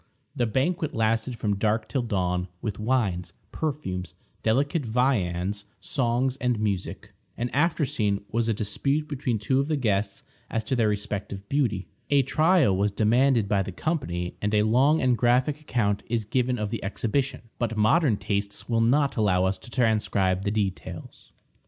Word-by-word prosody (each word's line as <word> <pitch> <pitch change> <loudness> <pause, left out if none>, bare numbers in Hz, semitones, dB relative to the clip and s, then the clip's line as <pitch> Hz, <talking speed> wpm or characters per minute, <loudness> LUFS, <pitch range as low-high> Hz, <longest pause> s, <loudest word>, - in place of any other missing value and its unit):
The 120 -4 +1
banquet 150 +6 0
lasted 115 +2 0
from 105 -3 -1
dark 110 +2 0
till 135 - -1
dawn, 90 -5 -1
with 105 -1 -4
wines, 105 -7 0 0.2
perfumes, 95 - -3 0.3
delicate 140 +8 +1
viands, 105 -5 0
songs, 125 0 0
and 125 -4 0
music. 100 -4 -3 0.3
An 120 +1 -2
after 155 +2 +2
scene 100 -5 -1
was 115 0 0
a - - +3
dispute 140 +9 -1
between 130 -5 -1
two 130 +6 +1
of 140 - 0
the 155 - +1
guests 100 -5 -1 0.3
as 115 - -1
to 130 - -1
their 115 -3 +2
respective 100 -1 -4
beauty. 120 -10 0 0.2
A 140 -1 +4
trial 155 - +3
was 100 +2 +2
demanded 115 +2 +3
by 100 -1 +2
the 95 0 -4
company, 90 - -2
and 105 +1 0
a 105 - +4
long 130 +8 +3
and 125 -1 +4
graphic 125 +5 +2
account 105 -8 0
is 115 -2 -1
given 125 +3 0
of 105 -2 -3
the 115 - -4
exhibition, 115 +7 -1 0.2
but 115 -2 -1
modern 110 +2 +3
tastes 100 0 -3
will 115 -1 +1
not 135 +4 +2
allow 95 -4 +3
us 95 0 -1
to - - -13
transcribe 105 -6 +1
the - - +2
details. 100 -3 -4
115 Hz, 165 wpm, -26 LUFS, 100-130 Hz, 0.3 s, A